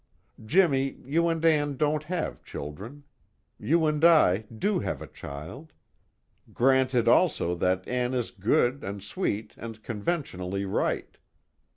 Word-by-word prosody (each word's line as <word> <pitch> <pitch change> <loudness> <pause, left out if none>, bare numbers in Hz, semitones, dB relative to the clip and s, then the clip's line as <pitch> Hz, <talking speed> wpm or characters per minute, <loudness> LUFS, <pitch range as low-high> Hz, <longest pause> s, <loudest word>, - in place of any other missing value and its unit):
Jimmy, 135 - +2
you 165 +5 +1
and 165 -1 -1
Ann 145 -3 +2
don't 150 +1 +1
have 155 - -3
children. 105 - -8 0.6
You 165 +2 +2
and 150 0 0
I 110 - +5
do 185 - 0
have - - -3
a - - -7
child. 80 - -9 0.8
Granted 130 -1 +2
also 85 - +3
that 90 +1 0
Ann 125 0 -1
is 125 -2 -2
good 120 +7 +1
and 100 0 -6
sweet 110 - -3
and 115 -1 -9
conventionally 100 - -3
right. 95 - -2
130 Hz, 130 wpm, -27 LUFS, 100-155 Hz, 0.8 s, I